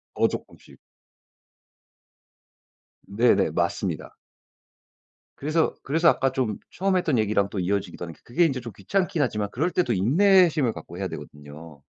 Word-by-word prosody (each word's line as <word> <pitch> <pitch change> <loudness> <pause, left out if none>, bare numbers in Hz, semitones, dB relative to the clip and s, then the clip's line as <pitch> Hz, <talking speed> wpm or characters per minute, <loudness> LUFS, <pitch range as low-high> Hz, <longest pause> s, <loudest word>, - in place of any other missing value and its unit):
어 - - +3
조끔씩. - - -9 2.3
네네. 115 +5 +2
맞습니다. - - -2 1.2
그래서, 155 +3 +1
그래서 165 +4 +2
아까 135 -4 +2
좀 125 -6 -1
처음에 190 0 0
했던 155 -7 0
얘기랑 105 -2 +1
또 100 - -4
이어지기도 95 0 -2
하는 85 -1 -8
그게 165 +9 +2
인제 135 -5 0
좀 120 -2 -8
귀찮긴 175 - -1
하지만 105 -5 -1
그럴 155 +8 0
때 - - -11
더 - - -1
인내심을 155 - +4
갖고 80 +2 -10
해야 95 - -2
되거든요. 75 +1 -11
125 Hz, 310 characters per minute, -25 LUFS, 100-165 Hz, 2.3 s, 인내심을